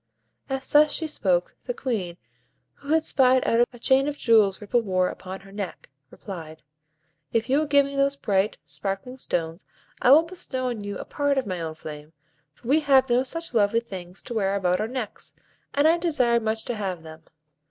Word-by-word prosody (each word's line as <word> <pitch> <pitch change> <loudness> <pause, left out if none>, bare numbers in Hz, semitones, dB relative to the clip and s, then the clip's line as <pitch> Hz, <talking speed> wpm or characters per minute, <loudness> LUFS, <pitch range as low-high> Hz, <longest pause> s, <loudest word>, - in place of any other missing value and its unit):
As 270 0 -2
thus 295 0 +6
she 320 - -1
spoke, 185 - 0
the - - -3
Queen, 205 - -3 0.6
who 285 +1 -8
had 320 0 +4
spied 260 -4 +3
out 240 +1 +4
a 245 - -13
chain 265 +3 +3
of 295 0 -3
jewels 215 -6 +4
Ripple 220 +3 +1
wore 185 -4 +1
upon 190 +1 -8
her 195 0 -15
neck, 200 -7 -6 0.2
replied,— 160 -5 -9 0.7
"If 230 +2 0
you 280 - +4
will 310 - -1
give 285 -1 +5
me 280 0 -6
those 275 0 +2
bright, 205 -6 0
sparkling 195 - -5
stones, 165 -4 -3 0.4
I - - +4
will 300 +5 +8
bestow 275 -7 -2
on 225 -4 -5
you 205 0 -5
a - - -7
part 285 -1 0
of 265 - +1
my 185 -3 -4
own 160 -1 -4
flame; 150 0 -9 0.4
for - - -14
we 290 +5 +4
have 270 -4 +4
no 245 +1 +4
such 330 +3 -3
lovely 220 0 +3
things 185 -5 -8
to - - -6
wear 200 -3 0
about 180 -1 +1
our 215 - -1
necks, 245 -3 -5 0.4
and 285 +2 +3
I 335 +2 +4
desire 260 -9 +2
much 220 0 -2
to 245 - -2
have 190 -6 -4
them. 160 0 -11
230 Hz, 200 wpm, -25 LUFS, 190-275 Hz, 0.7 s, will